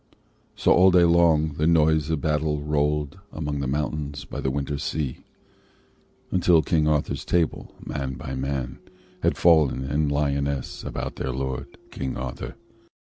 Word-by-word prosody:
So - - +2
all 95 +1 +6
day 90 -1 +5
long 85 -3 +3
the 80 - +2
noise 80 -2 +3
of 80 -3 -1
battle 75 -1 0
rolled 75 +2 0
Among 75 -2 -3
the 70 - -2
mountains 70 0 -3
by - - -6
the 65 - 0
winter 70 +1 -2
sea; 70 -4 -3 1.1
Until 85 -3 +4
King 75 0 +2
Arthur's 75 -1 0
Table, 85 -2 -1
man 65 -1 -4
by 65 - -6
man, 65 -1 -3 0.4
Had 85 -3 +1
fallen 80 -6 +4
in 70 +2 0
Lyonnesse 70 -2 -1
about - - -5
their 65 - -2
lord, 65 +1 -4
King 65 -1 -4
Arthur. 65 0 -6
75 Hz, 145 wpm, -25 LUFS, 70-80 Hz, 1.1 s, all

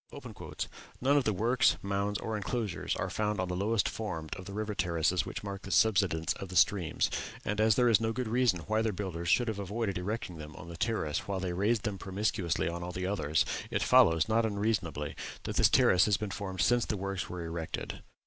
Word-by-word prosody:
"None 135 +3 +3
of 140 -3 +3
the 110 - +3
works, 115 +6 +3
mounds, 100 +1 -1
or 110 0 -3
enclosures 105 -2 -2
are - - -3
found 105 -1 -1
on 90 0 -1
the 90 - -2
lowest 105 +3 +1
formed 85 -8 -4
of 95 - -9
the 100 - -7
river 105 +1 -3
terraces 85 -2 +1
which - - -5
mark 100 -1 -5
the - - -9
subsidence 95 -8 +3
of 95 - -8
the 90 - -7
streams, 85 -1 +3 0.3
and 105 +1 0
as 110 -1 +5
there 125 -1 +4
is 115 -3 +5
no 110 0 +1
good 125 +1 -3
reason 115 -6 +2
why 110 +6 0
their 110 -2 0
builders 85 -3 -4
should 120 +6 +4
have 110 -2 -2
avoided 100 -1 -2
erecting 90 -3 -4
them 75 0 -9
on 85 - -10
that 85 0 -9
terrace 110 -10 -1
while 100 -1 -2
they 90 -1 -2
raised 105 +4 +1
them 105 -3 -3
promiscuously 95 -4 -1
on 85 +1 -3
all 90 +1 -4
the 90 0 -3
others, 80 -6 +1 0.2
it - - 0
follows, 80 +1 +5
not 115 +1 +3
unreasonably, 100 -9 -1 0.3
that - - -4
this - - +6
terrace 90 - +5
has 105 -3 +3
been 105 -2 -4
formed 95 -2 -4
since 120 -1 +3
the 105 - -2
works 100 0 -3
were 90 -1 -5
erected." 85 -1 -5
100 Hz, 215 wpm, -31 LUFS, 90-110 Hz, 0.3 s, this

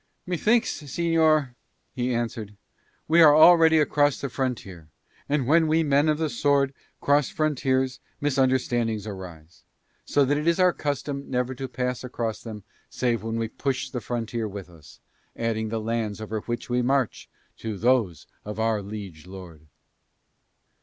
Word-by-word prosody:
"Methinks, 215 +4 +1
señor," 155 -2 +1 0.4
he 125 -1 -1
answered, 115 -3 -3 0.5
"we 165 +2 +5
are 150 -2 +8
already 160 0 +7
across 145 -2 +2
the 140 - -4
frontier, 100 - -4 0.4
and 140 -3 +1
when 160 +4 +4
we 160 +1 +2
men 145 +1 +3
of 150 - +2
the 160 0 0
sword 140 -2 +1 0.3
cross 145 -1 +2
frontiers 130 -4 0 0.2
misunderstandings 130 -6 0
arise, 90 -5 -10 0.4
so 145 -1 +2
that 145 +2 +1
it 150 - -3
is 170 +2 +3
our 180 -1 +5
custom 140 -1 -4
never 125 0 -1
to 130 +1 -5
pass 125 0 -3
across 120 -3 -4
them 110 -3 -8 0.3
save 120 -4 -1
when 115 +1 -4
we 115 -1 -1
push 130 +3 -3
the 125 - -4
frontier 115 -1 -3
with 100 -3 -8
us, 80 -4 -17 0.4
adding 110 -1 -2
the 115 0 -2
lands 110 -1 -2
over 110 0 -4
which 120 +2 -5
we 125 0 +1
march 130 -1 0 0.3
to 110 -3 -5
those 115 - +1 0.2
of 105 +1 -6
our 110 -1 +1
liege 95 -5 -8
lord." 90 -5 -11
125 Hz, 155 wpm, -25 LUFS, 110-145 Hz, 0.5 s, are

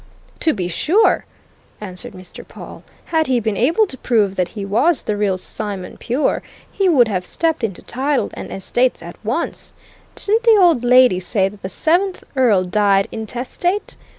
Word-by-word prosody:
"To 320 - +2
be 185 -8 -3
sure!" 340 - +2 0.5
answered 210 +4 -8
Mr. 185 -1 -10
Pawle. - - -11 0.3
"Had 320 -1 +2
he 255 -2 +2
been 220 -2 -2
able 330 - +3
to 265 -9 -9
prove 210 -5 +1
that 180 -2 0
he 200 - -3
was 255 - +2
the 210 - -1
real 205 -2 0
Simon 195 0 -6
pure, 255 +5 -1 0.3
he 390 -2 +1
would 255 -8 +5
have 185 -4 -2
stepped 325 - -1
into 195 -5 -3
title 270 +2 -1
and - - -8
estates 245 +6 0
at - - -11
once. - - -3 0.4
Didn't 435 +3 0
the 460 -2 +5
old 335 -10 +4
lady 250 -6 +5
say 190 +1 0
that 200 0 -15
the 190 - -5
seventh 360 - 0
Earl 230 -8 +3
died 195 +1 +2
intestate? 250 - -3
235 Hz, 170 wpm, -19 LUFS, 195-315 Hz, 0.5 s, would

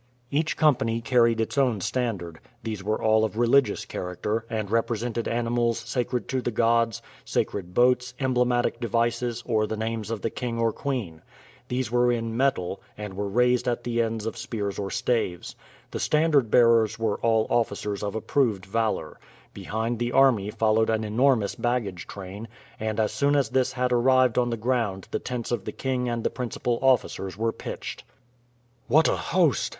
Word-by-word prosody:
Each 155 +2 0
company 120 -7 +2
carried 115 -1 +3
its 115 +5 -1
own 125 -6 +2
standard; 95 -7 -3 0.2
these 110 -3 -4
were 110 +2 -1
all 110 0 +3
of 110 0 -2
religious 125 +3 +3
character, 105 +5 -3
and 110 -2 -3
represented 115 0 -1
animals 120 0 0
sacred 120 +1 -2
to 130 -1 0
the 120 - -1
gods, 115 -1 +1 0.2
sacred 90 -3 -2
boats, 125 0 +3
emblematic 125 -3 +1
devices, 120 0 -1
or 110 -3 +1
the 110 - -4
names 110 -1 -3
of 115 -2 -3
the 115 - -1
king 120 -2 -4
or 115 -1 +1
queen. 110 - -4 0.5
These 125 -2 -2
were 120 0 +3
in 115 -1 -2
metal, 115 -8 0 0.2
and 105 -2 -6
were 100 +1 -3
raised 125 +4 +2
at 120 - -1
the 120 -1 0
ends 110 -1 -2
of 115 +1 -4
spears 105 -4 -4
or 100 -1 -3
staves. 105 -6 -1 0.4
The - - -4
standard 150 -6 +2
bearers 115 -2 +4
were 110 -2 -1
all 110 -1 +2
officers 105 -3 -1
of 100 0 -3
approved 110 -4 0
valor. 110 +2 -2 0.3
Behind 110 +2 -3
the 120 0 -1
army 130 -7 +4
followed 110 +1 +2
an 110 0 +1
enormous 110 0 +2
baggage 115 -7 -2
train; 100 +3 -8 0.3
and 110 0 -2
as 110 -1 +1
soon 145 +1 +2
as 140 -5 +2
this 130 +1 +1
had 125 -1 0
arrived 130 0 +4
on 120 0 +1
the 115 - -2
ground 110 -5 -1
the - - -1
tents 125 -2 -4
of 120 -5 -2
the - - -3
king 125 -2 -2
and 120 -1 -2
the - - 0
principal 120 -1 -2
officers 120 -7 +1
were 115 +1 0
pitched. - - -7 0.8
"What 155 +6 +5
a - - +2
host!" 165 - +1
115 Hz, 175 wpm, -26 LUFS, 110-125 Hz, 0.8 s, What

